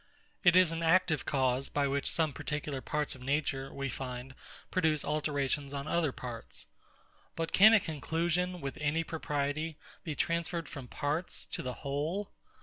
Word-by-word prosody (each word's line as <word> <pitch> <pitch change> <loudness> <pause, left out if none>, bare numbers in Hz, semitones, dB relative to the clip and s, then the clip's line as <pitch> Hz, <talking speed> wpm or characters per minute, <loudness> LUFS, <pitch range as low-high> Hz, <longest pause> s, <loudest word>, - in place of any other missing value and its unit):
It 175 -2 +7
is 185 -2 +7
an 165 0 -3
active 165 -2 +3
cause, 130 -1 +1
by 145 -1 +1
which 140 0 0
some 160 -3 +2
particular 150 -2 -3
parts 150 +1 -1
of 130 - -12
nature, 135 0 0
we 140 0 -3
find, 125 0 -5 0.4
produce 160 -5 +2
alterations 145 -1 -1
on 140 +1 -4
other 165 -4 +2
parts. 115 - -7 0.7
But 165 0 -2
can 220 +3 +8
a - - +7
conclusion, 170 +3 -1
with 135 -1 -5
any 155 +2 +1
propriety, 155 0 -2 0.3
be 160 -5 -3
transferred 170 0 -1
from 130 -2 -8
parts 150 +7 -2
to - - -2
the 125 -1 -3
whole? 155 +9 -2
150 Hz, 155 wpm, -32 LUFS, 140-165 Hz, 0.7 s, can